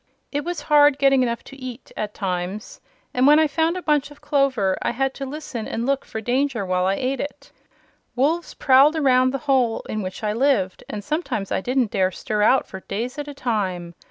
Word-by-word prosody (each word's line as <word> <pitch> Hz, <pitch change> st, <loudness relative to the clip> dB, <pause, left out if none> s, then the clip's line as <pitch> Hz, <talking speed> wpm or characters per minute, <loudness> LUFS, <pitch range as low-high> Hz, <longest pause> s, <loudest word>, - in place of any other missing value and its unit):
It 290 Hz, 0 st, -2 dB
was 345 Hz, -2 st, -4 dB
hard 295 Hz, -2 st, +5 dB
getting 275 Hz, -1 st, +4 dB
enough 235 Hz, -2 st, -1 dB
to 275 Hz, -, -12 dB
eat, 255 Hz, -2 st, -9 dB
at 210 Hz, -1 st, -4 dB
times, 185 Hz, +1 st, -4 dB, 0.3 s
and 255 Hz, +2 st, +3 dB
when 295 Hz, +1 st, +7 dB
I 315 Hz, -, +5 dB
found 320 Hz, +4 st, 0 dB
a 365 Hz, -, -6 dB
bunch 295 Hz, -2 st, +1 dB
of 290 Hz, -, -15 dB
clover 275 Hz, -10 st, +1 dB
I -, -, 0 dB
had 270 Hz, +3 st, -1 dB
to 275 Hz, -, -6 dB
listen 270 Hz, -6 st, -6 dB
and 230 Hz, -, -3 dB
look 275 Hz, +1 st, 0 dB
for 220 Hz, -, -5 dB
danger 245 Hz, -2 st, 0 dB
while 185 Hz, 0 st, +1 dB
I 195 Hz, -, +2 dB
ate 260 Hz, +2 st, -2 dB
it. 290 Hz, -, -7 dB, 0.6 s
Wolves 310 Hz, +7 st, 0 dB
prowled 275 Hz, +3 st, +5 dB
around 255 Hz, -4 st, +3 dB
the 275 Hz, -, -2 dB
hole 255 Hz, -5 st, +2 dB
in 215 Hz, -, -3 dB
which 185 Hz, +2 st, -6 dB
I 210 Hz, 0 st, 0 dB
lived 230 Hz, -7 st, +1 dB
and 205 Hz, -, -5 dB
sometimes 295 Hz, -, -3 dB
I -, -, 0 dB
didn't 250 Hz, 0 st, 0 dB
dare 190 Hz, -3 st, +2 dB
stir 210 Hz, +3 st, -3 dB
out 260 Hz, +5 st, +4 dB
for 190 Hz, -, -9 dB
days 235 Hz, +9 st, -5 dB
at 290 Hz, -, -5 dB
a 290 Hz, -, -8 dB
time. 190 Hz, -9 st, -2 dB
255 Hz, 215 wpm, -22 LUFS, 210-285 Hz, 0.6 s, when